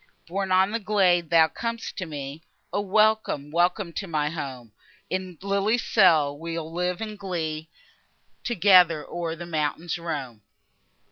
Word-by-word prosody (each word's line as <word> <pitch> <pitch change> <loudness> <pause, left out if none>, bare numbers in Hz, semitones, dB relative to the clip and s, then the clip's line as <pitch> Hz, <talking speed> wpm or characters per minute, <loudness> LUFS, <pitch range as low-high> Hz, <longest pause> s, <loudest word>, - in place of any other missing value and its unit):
Borne 190 +2 -3
on 190 +2 +4
the 230 - -1
gale, 195 -4 +3
thou 165 -1 +6
com'st 230 +6 -5
to 185 - -4
me; 145 0 -7 0.3
O! 205 - +1
welcome, 215 -7 +1
welcome 175 +2 +1
to 195 - -4
my 150 -3 -1
home! 130 -8 -6 0.4
In 185 -2 -3
lily's 200 +4 +1
cell 160 -9 +4
we'll 165 +1 -5
live 180 +2 -2
in 215 -1 -4
glee, 165 -5 -4 0.7
Together 180 -7 +5
o'er 170 -2 -4
the 175 +1 -8
mountains 165 +1 -2
roam! 140 -10 -5
175 Hz, 140 wpm, -25 LUFS, 155-195 Hz, 0.7 s, thou